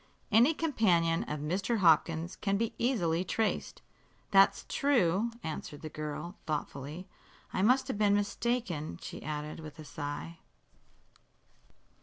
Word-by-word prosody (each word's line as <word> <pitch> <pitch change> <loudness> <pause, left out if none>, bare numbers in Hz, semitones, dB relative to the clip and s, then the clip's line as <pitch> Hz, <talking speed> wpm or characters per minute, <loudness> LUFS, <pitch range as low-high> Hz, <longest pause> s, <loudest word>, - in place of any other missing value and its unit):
"Any 240 +9 +5
companion 180 - +2
of 150 -1 -4
Mr. 190 +9 0
Hopkins 165 -1 +3
can 200 -1 0
be 230 +1 -1
easily 180 -9 +1
traced." 220 +3 -2 0.5
"That's 195 -1 +5
true," 230 -7 +2
answered 150 -1 -6
the 155 - -4
girl, 155 +5 -5
thoughtfully. 150 +3 -4 0.5
"I - - 0
must 255 +5 +4
have 235 -6 -3
been 205 -1 +4
mistaken," 205 - -1
she - - -8
added, 150 +1 -5
with 155 -2 -9
a 155 - -9
sigh. 145 +3 -6
175 Hz, 125 wpm, -31 LUFS, 155-220 Hz, 0.5 s, Any